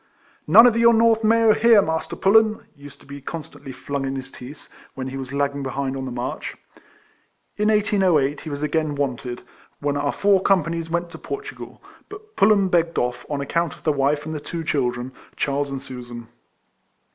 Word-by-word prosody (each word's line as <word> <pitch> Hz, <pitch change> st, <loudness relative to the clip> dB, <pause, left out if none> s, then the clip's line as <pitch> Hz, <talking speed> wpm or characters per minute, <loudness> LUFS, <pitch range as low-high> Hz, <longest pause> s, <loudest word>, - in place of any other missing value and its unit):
" -, -, -35 dB
None 230 Hz, -, +11 dB
of 240 Hz, -2 st, +5 dB
your 235 Hz, 0 st, +5 dB
North 225 Hz, 0 st, +3 dB
May/w, 225 Hz, 0 st, +4 dB
here, 230 Hz, -1 st, +6 dB
Master 160 Hz, -4 st, -2 dB
Pullen!" 215 Hz, +2 st, +3 dB
used 140 Hz, -1 st, -14 dB
to -, -, -18 dB
be 140 Hz, 0 st, -10 dB
constantly 150 Hz, -3 st, -8 dB
flung 140 Hz, +1 st, -4 dB
in 135 Hz, 0 st, -3 dB
his 135 Hz, 0 st, -7 dB
teeth, 130 Hz, +4 st, -12 dB, 0.3 s
when 130 Hz, 0 st, -5 dB
he 130 Hz, -, -7 dB
was 135 Hz, -1 st, -6 dB
lagging 140 Hz, 0 st, -1 dB
behind 135 Hz, 0 st, -3 dB
on 135 Hz, -1 st, -4 dB
the 130 Hz, -, -5 dB
march. 120 Hz, +1 st, -5 dB, 1.0 s
In 210 Hz, +1 st, +1 dB
1808 190 Hz, -9 st, +2 dB
he 160 Hz, -, -7 dB
was 145 Hz, 0 st, -5 dB
again 150 Hz, 0 st, -1 dB
wanted, 125 Hz, -3 st, -3 dB, 0.4 s
when 145 Hz, 0 st, -1 dB
our 145 Hz, 0 st, 0 dB
four 200 Hz, -2 st, +2 dB
companies 170 Hz, -4 st, 0 dB
went 170 Hz, 0 st, -2 dB
to 160 Hz, -, -10 dB
Portugal; 415 Hz, 0 st, -8 dB, 0.3 s
but 420 Hz, +1 st, -12 dB
Pullen 200 Hz, -1 st, +4 dB
begged 170 Hz, -2 st, +1 dB
off, 125 Hz, 0 st, -2 dB
on 145 Hz, -2 st, -2 dB
account 170 Hz, +2 st, -1 dB
of -, -, -21 dB
the 155 Hz, -, +2 dB
wife 145 Hz, +1 st, 0 dB
and 160 Hz, -, -5 dB
the 155 Hz, -, -4 dB
two 165 Hz, +3 st, -6 dB
children, 125 Hz, -4 st, -1 dB, 0.2 s
Charles 140 Hz, 0 st, -1 dB
and 135 Hz, -1 st, -6 dB
Susan. 120 Hz, -3 st, -9 dB
150 Hz, 190 wpm, -22 LUFS, 135-195 Hz, 1.0 s, None